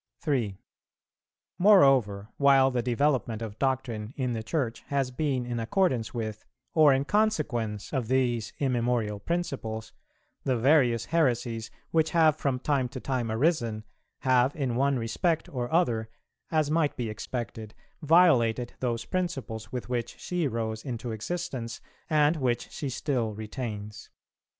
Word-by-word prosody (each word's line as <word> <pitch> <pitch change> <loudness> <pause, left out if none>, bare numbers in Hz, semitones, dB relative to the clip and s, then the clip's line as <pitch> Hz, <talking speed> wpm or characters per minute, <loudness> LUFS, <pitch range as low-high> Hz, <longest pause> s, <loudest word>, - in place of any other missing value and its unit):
3. 125 - -1 1.0
Moreover, 135 - +5
while 135 -1 +5
the 125 -1 0
development 120 -2 0
of 110 -1 -7
doctrine 130 -4 -2
in 125 -3 -1
the 110 - -3
Church 115 0 -2
has 135 -2 0
been 130 -2 -1
in 120 -1 -3
accordance 120 - +1
with, 110 -3 -4 0.3
or 155 -3 +6
in 135 +1 +2
consequence 145 - 0
of 130 -5 -1
these 120 -3 +1
immemorial 120 -5 0
principles, 110 -8 -3 0.5
the 130 -2 +1
various 125 -2 +3
heresies, 120 -8 0 0.2
which 160 -1 +3
have 160 -3 +4
from 135 -4 -1
time 135 -1 0
to 130 - -7
time 125 -3 -2
arisen, 115 -4 +1 0.4
have 130 +1 +3
in 130 -5 -1
one 135 +1 +2
respect 150 +9 0
or 125 -2 -4
other, 120 -10 +1 0.4
as 155 -2 +1
might 160 -2 +1
be 120 - -2
expected, 110 0 -5 0.3
violated 130 -8 +4
those 120 -2 -2
principles 140 - -3
with 125 -2 -4
which 120 -2 -3
she 175 -4 -1
rose 110 -2 -3
into 120 -2 -4
existence, 125 -1 -4 0.3
and 155 0 +3
which 125 -4 -1
she 145 - -4
still 120 -5 -1
retains. 105 -1 -6
125 Hz, 135 wpm, -28 LUFS, 115-145 Hz, 1.0 s, or